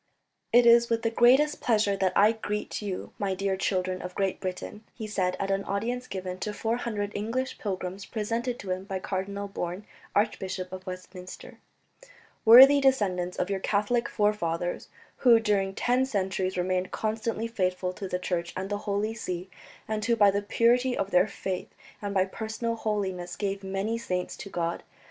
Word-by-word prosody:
"It 240 Hz, +1 st, +6 dB
is 235 Hz, 0 st, +6 dB
with 230 Hz, 0 st, 0 dB
the 230 Hz, -, +1 dB
greatest 265 Hz, +6 st, +4 dB
pleasure 210 Hz, -4 st, +2 dB
that 190 Hz, -2 st, +1 dB
I 210 Hz, +2 st, +6 dB
greet 210 Hz, -2 st, -4 dB
you, 200 Hz, -3 st, -5 dB
my 195 Hz, -2 st, 0 dB
dear 195 Hz, 0 st, 0 dB
children 185 Hz, -1 st, -1 dB
of 180 Hz, 0 st, -7 dB
Great 195 Hz, -1 st, 0 dB
Britain," 185 Hz, +3 st, -5 dB
he 220 Hz, -, -6 dB
said 185 Hz, -4 st, -1 dB
at 195 Hz, 0 st, -1 dB
an 195 Hz, 0 st, 0 dB
audience 240 Hz, +5 st, -2 dB
given 185 Hz, -1 st, -5 dB
to 210 Hz, -, -3 dB
four 225 Hz, +2 st, -1 dB
hundred 210 Hz, -4 st, -3 dB
English 230 Hz, +5 st, -3 dB
pilgrims 190 Hz, -1 st, -4 dB
presented 230 Hz, +3 st, -2 dB
to 190 Hz, -, -6 dB
him 185 Hz, +1 st, -3 dB
by 195 Hz, -1 st, -3 dB
Cardinal 200 Hz, +2 st, -3 dB
Bourne, 185 Hz, 0 st, -5 dB, 0.3 s
Archbishop 190 Hz, -3 st, -1 dB
of 185 Hz, 0 st, -8 dB
Westminster, 185 Hz, 0 st, -9 dB, 0.9 s
"worthy 265 Hz, +5 st, +10 dB
descendants 190 Hz, -10 st, +1 dB
of 180 Hz, -, -1 dB
your 195 Hz, -, 0 dB
Catholic 210 Hz, +5 st, 0 dB
forefathers 175 Hz, -5 st, -1 dB, 0.3 s
who 235 Hz, -3 st, +6 dB
during 200 Hz, -3 st, 0 dB
ten 250 Hz, +4 st, +2 dB
centuries 190 Hz, -4 st, -1 dB
remained 185 Hz, +1 st, 0 dB
constantly 220 Hz, +1 st, -2 dB
faithful 185 Hz, -4 st, -1 dB
to 195 Hz, +1 st, -6 dB
the 180 Hz, -, -1 dB
Church 175 Hz, -2 st, -3 dB
and 190 Hz, +2 st, -4 dB
the 205 Hz, -, -1 dB
Holy 205 Hz, +2 st, 0 dB
See, 185 Hz, -4 st, -5 dB, 0.4 s
and 215 Hz, -1 st, -2 dB
who 235 Hz, +2 st, +2 dB
by 205 Hz, -3 st, +6 dB
the 200 Hz, +1 st, 0 dB
purity 240 Hz, +4 st, +2 dB
of 195 Hz, 0 st, -2 dB
their 180 Hz, +3 st, +4 dB
faith 190 Hz, -2 st, -4 dB, 0.3 s
and 205 Hz, -1 st, -3 dB
by 190 Hz, -1 st, +2 dB
personal 220 Hz, +3 st, -3 dB
holiness 190 Hz, -5 st, -2 dB
gave 195 Hz, -1 st, -3 dB
many 195 Hz, +4 st, -2 dB
saints 180 Hz, -5 st, -3 dB
to -, -, -8 dB
God. 170 Hz, -2 st, -2 dB
200 Hz, 175 wpm, -28 LUFS, 185-225 Hz, 0.9 s, worthy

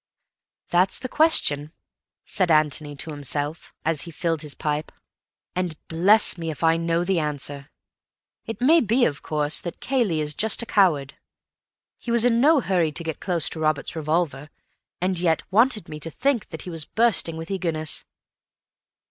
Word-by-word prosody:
_ -, -, -39 dB
"That's 180 Hz, +2 st, +2 dB
the 255 Hz, -, -5 dB
question," 155 Hz, -, +2 dB, 0.5 s
said 185 Hz, -3 st, +2 dB
Antony 150 Hz, -2 st, +2 dB
to 155 Hz, +3 st, -6 dB
himself, 145 Hz, +2 st, -4 dB
as 160 Hz, -2 st, +1 dB
he 170 Hz, -, -8 dB
filled 165 Hz, -1 st, -2 dB
his 150 Hz, -2 st, -8 dB
pipe, 150 Hz, 0 st, -3 dB, 0.6 s
"and 180 Hz, -4 st, -2 dB
bless 185 Hz, +3 st, +4 dB
me 165 Hz, -1 st, -4 dB
if 155 Hz, -, -6 dB
I 165 Hz, 0 st, +4 dB
know 165 Hz, +1 st, 0 dB
the 180 Hz, -1 st, +1 dB
answer. 145 Hz, -1 st, -3 dB, 0.8 s
It 225 Hz, +1 st, -6 dB
may 315 Hz, +6 st, +5 dB
be, 240 Hz, +3 st, +2 dB
of 145 Hz, -2 st, -2 dB
course, 150 Hz, 0 st, 0 dB
that 175 Hz, -, -7 dB
Cayley 235 Hz, -12 st, 0 dB
is 150 Hz, -1 st, -1 dB
just 220 Hz, +7 st, 0 dB
a -, -, -6 dB
coward. 160 Hz, -11 st, +1 dB, 0.8 s
He -, -, -8 dB
was 235 Hz, 0 st, +3 dB
in 235 Hz, -1 st, +3 dB
no 295 Hz, +1 st, +5 dB
hurry 175 Hz, -7 st, +1 dB
to 170 Hz, -, -4 dB
get 160 Hz, -2 st, -4 dB
close 175 Hz, -4 st, 0 dB
to -, -, -6 dB
Robert's 155 Hz, 0 st, -1 dB
revolver, 155 Hz, -2 st, -1 dB, 0.5 s
and 185 Hz, 0 st, 0 dB
yet 165 Hz, -3 st, +1 dB
wanted 225 Hz, +1 st, +3 dB
me 150 Hz, -, -8 dB
to 165 Hz, -, -7 dB
think 245 Hz, -, 0 dB
that -, -, -8 dB
he 180 Hz, -, -7 dB
was 165 Hz, -2 st, -2 dB
bursting 220 Hz, -5 st, +1 dB
with 165 Hz, +3 st, -7 dB
eagerness. 165 Hz, -5 st, -1 dB
165 Hz, 175 wpm, -24 LUFS, 150-200 Hz, 0.8 s, may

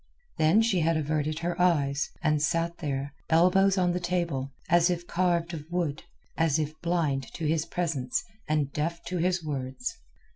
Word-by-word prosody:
Then 165 Hz, +8 st, +5 dB
she 205 Hz, -5 st, +2 dB
had 165 Hz, 0 st, +2 dB
averted 155 Hz, 0 st, -1 dB
her 175 Hz, +2 st, -2 dB
eyes, 145 Hz, -5 st, +2 dB
and 150 Hz, -2 st, +2 dB
sat 170 Hz, +2 st, 0 dB
there, 140 Hz, -3 st, -3 dB, 0.2 s
elbows 185 Hz, +4 st, +4 dB
on 180 Hz, -1 st, +3 dB
the 180 Hz, -, -1 dB
table, 170 Hz, -7 st, -1 dB, 0.2 s
as 175 Hz, 0 st, +4 dB
if 175 Hz, -1 st, -2 dB
carved 175 Hz, -1 st, 0 dB
of 155 Hz, -1 st, -7 dB
wood, 170 Hz, -4 st, -1 dB, 0.3 s
as 165 Hz, -2 st, +2 dB
if 155 Hz, -1 st, -2 dB
blind 160 Hz, -6 st, 0 dB
to 165 Hz, -, -3 dB
his 160 Hz, +1 st, +1 dB
presence 160 Hz, -8 st, -1 dB, 0.2 s
and 150 Hz, -3 st, 0 dB
deaf 165 Hz, +3 st, -2 dB
to 180 Hz, -1 st, -3 dB
his 180 Hz, 0 st, +1 dB
words. 140 Hz, -, -4 dB
165 Hz, 170 wpm, -28 LUFS, 150-175 Hz, 0.3 s, Then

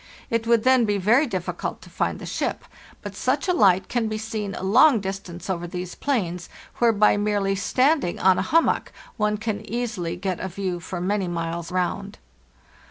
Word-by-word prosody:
It 230 Hz, 0 st, 0 dB
would 230 Hz, -2 st, +4 dB
then 260 Hz, -1 st, +5 dB
be 205 Hz, -1 st, +1 dB
very 235 Hz, +10 st, +3 dB
difficult 185 Hz, -6 st, -4 dB
to -, -, -14 dB
find -, -, -1 dB
the -, -, -9 dB
ship; -, -, -3 dB, 0.4 s
but -, -, -7 dB
such -, -, 0 dB
a 360 Hz, -, +3 dB
hght 190 Hz, -, +4 dB
can 240 Hz, -2 st, -1 dB
be 215 Hz, 0 st, -3 dB
seen 215 Hz, -2 st, -4 dB
a -, -, -6 dB
long 230 Hz, +6 st, +5 dB
distance 190 Hz, -3 st, -6 dB
over 175 Hz, -2 st, -2 dB
these 180 Hz, 0 st, -5 dB
plains, 180 Hz, -11 st, -2 dB, 0.3 s
where 235 Hz, -1 st, +4 dB
by 210 Hz, -1 st, +4 dB
merely 205 Hz, -1 st, 0 dB
standing 255 Hz, -, +1 dB
on 185 Hz, -1 st, +4 dB
a -, -, -3 dB
hum 330 Hz, +3 st, +5 dB
mock -, -, -1 dB, 0.3 s
one 210 Hz, -1 st, +1 dB
can 220 Hz, -1 st, -3 dB
easily 220 Hz, -7 st, -3 dB
get 180 Hz, 0 st, -3 dB
a -, -, -3 dB
view 185 Hz, -1 st, -3 dB
for 175 Hz, +1 st, -6 dB
many 190 Hz, +1 st, 0 dB
miles 170 Hz, 0 st, -4 dB
round. 180 Hz, -1 st, -2 dB
200 Hz, 190 wpm, -24 LUFS, 180-230 Hz, 0.4 s, then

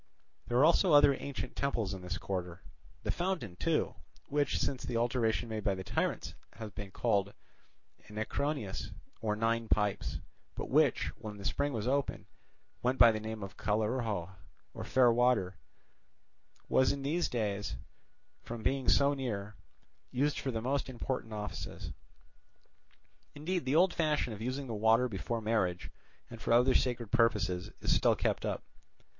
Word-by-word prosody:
There 120 Hz, -, +1 dB
are 135 Hz, -, +7 dB
also 170 Hz, +1 st, +4 dB
other 145 Hz, -1 st, +8 dB
ancient 135 Hz, -2 st, -5 dB
temples 115 Hz, -8 st, -1 dB
in 95 Hz, -, -6 dB
this 90 Hz, 0 st, -4 dB
quarter. 90 Hz, -2 st, -4 dB, 0.4 s
The -, -, 0 dB
fountain 175 Hz, -, -2 dB
too, -, -, 0 dB, 0.4 s
which, 145 Hz, 0 st, +1 dB
since 130 Hz, -, -1 dB
the 120 Hz, -, -2 dB
alteration 120 Hz, -1 st, +1 dB
made 110 Hz, -2 st, -4 dB
by 100 Hz, -1 st, +1 dB
the 95 Hz, -, -6 dB
tyrants, -, -, -1 dB, 0.2 s
has 110 Hz, -2 st, -7 dB
been 100 Hz, -1 st, -7 dB
called 100 Hz, -1 st, 0 dB, 0.7 s
Enneacrounos, 110 Hz, +1 st, -3 dB, 0.3 s
or 105 Hz, -2 st, 0 dB
Nine 115 Hz, +1 st, 0 dB
Pipes, 105 Hz, -2 st, 0 dB, 0.4 s
but -, -, -5 dB
which, -, -, +3 dB
when 105 Hz, -1 st, -7 dB
the 100 Hz, -, -9 dB
spring 145 Hz, 0 st, 0 dB
was 115 Hz, -3 st, -2 dB
open, 140 Hz, +1 st, 0 dB, 0.6 s
went 125 Hz, +2 st, +1 dB
by 115 Hz, -, +8 dB
the 110 Hz, -, -2 dB
name 110 Hz, -1 st, -5 dB
of 100 Hz, -, -8 dB
Callirhoe, 110 Hz, -3 st, -1 dB, 0.4 s
or -, -, -6 dB
Fairwater, 120 Hz, -6 st, +3 dB, 1.1 s
was 130 Hz, -, +4 dB
in 140 Hz, -1 st, -4 dB
those 165 Hz, +5 st, 0 dB
days, 105 Hz, -, -2 dB, 0.7 s
from 115 Hz, -1 st, -7 dB
being 135 Hz, +2 st, +1 dB
so 140 Hz, +1 st, +5 dB
near, 105 Hz, -7 st, -4 dB, 0.5 s
used 145 Hz, +3 st, 0 dB
for 135 Hz, -, -3 dB
the 115 Hz, -3 st, -2 dB
most 135 Hz, +2 st, 0 dB
important 125 Hz, -2 st, -4 dB
offices. 105 Hz, -1 st, -5 dB, 1.4 s
Indeed, 170 Hz, +2 st, -2 dB
the 135 Hz, +3 st, +1 dB
old 180 Hz, +3 st, +5 dB
fashion 150 Hz, -7 st, +1 dB
of 105 Hz, -, -8 dB
using 130 Hz, +4 st, -2 dB
the 120 Hz, -, -5 dB
water 110 Hz, +3 st, +4 dB
before 115 Hz, +2 st, -3 dB
marriage 105 Hz, -5 st, 0 dB, 0.4 s
and 115 Hz, -2 st, -10 dB
for 115 Hz, -, +1 dB
other 125 Hz, +2 st, +5 dB
sacred 120 Hz, -4 st, 0 dB
purposes 105 Hz, -7 st, +2 dB
is -, -, +3 dB
still -, -, +4 dB
kept -, -, 0 dB
up. -, -, -3 dB
115 Hz, 155 wpm, -32 LUFS, 105-135 Hz, 1.4 s, other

